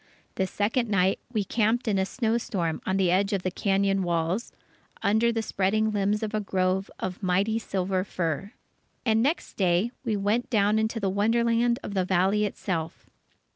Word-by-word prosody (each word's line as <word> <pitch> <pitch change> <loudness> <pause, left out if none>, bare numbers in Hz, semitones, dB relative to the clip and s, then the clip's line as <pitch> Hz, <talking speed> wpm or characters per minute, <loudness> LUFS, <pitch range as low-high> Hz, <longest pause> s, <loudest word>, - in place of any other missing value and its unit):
The 190 - -1
second 225 +5 0
night, 190 -2 +2
we 215 -4 0
camped 230 +4 0
in 200 -3 +2
a 190 - +1
snow 230 -1 0
storm 170 -8 -2
on 190 - +1
the 185 -3 +2
edge 195 +3 +2
of 195 -2 -1
the 185 - -1
cañon 195 +1 +1
walls, 175 +4 -1 0.5
under 220 +3 +3
the 225 -1 -1
spreading 215 +2 +1
limbs 205 +1 0
of 215 - -3
a 215 - +1
grove 190 -1 0
of 185 +1 -5
mighty 195 +4 +1
silver 190 -3 -1
fir. 180 0 -3 0.5
And 220 -1 +3
next 290 +8 -1
day, 185 +4 +2
we 220 -5 0
went 210 +5 0
down 210 -2 +3
into 220 +1 -1
the 200 - -1
wonderland 235 +3 +2
of - - -5
the 190 -2 +1
Valley 190 +3 +2
itself. 170 -5 -4
200 Hz, 175 wpm, -26 LUFS, 190-220 Hz, 0.5 s, under